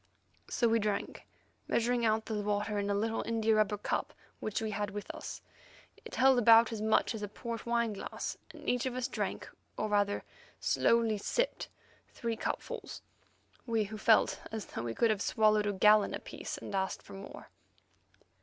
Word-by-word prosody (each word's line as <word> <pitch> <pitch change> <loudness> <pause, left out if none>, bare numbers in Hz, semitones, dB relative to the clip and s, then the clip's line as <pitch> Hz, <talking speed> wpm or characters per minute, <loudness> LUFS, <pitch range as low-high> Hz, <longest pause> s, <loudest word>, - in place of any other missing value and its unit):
So 235 - +2
we 230 0 +3
drank, 205 -1 -3 0.4
measuring 235 0 +1
out 220 0 +2
the 215 -2 -2
water 205 0 -1
in 200 0 -1
a 200 - +1
little 225 +2 0
india 225 -1 +1
rubber 215 -1 +2
cup - - -2 0.2
which 215 - -2
we 220 -1 -2
had 205 0 -2
with 205 0 -6
us. - - -7 0.6
It - - -7
held 265 -1 +5
about 230 0 +7
as 220 -2 -4
much 220 +2 +2
as 220 - -5
a 205 - -2
port 230 +3 -6
wine 235 -2 +1
glass, 200 - -5 0.2
and - - -12
each 250 +1 +1
of 250 - -3
us 255 0 -1
drank, - - -3 0.3
or 215 - -1
rather 205 -1 +1 0.4
slowly 230 -2 +2
sipped, - - -1 0.4
three 230 -1 -3
cupfuls; - - -5 0.6
we 225 -2 +2
who 210 +1 -6
felt 220 +1 +4
as 220 -1 -4
though - - -6
we 115 -1 -4
could 230 -2 +3
have 205 -2 -1
swallowed 215 -1 +3
a - - +2
gallon 210 +1 +5
apiece, - - -6
and - - -8
asked 190 -1 -1
for - - -12
more. 195 0 -10
215 Hz, 180 wpm, -32 LUFS, 205-230 Hz, 0.6 s, about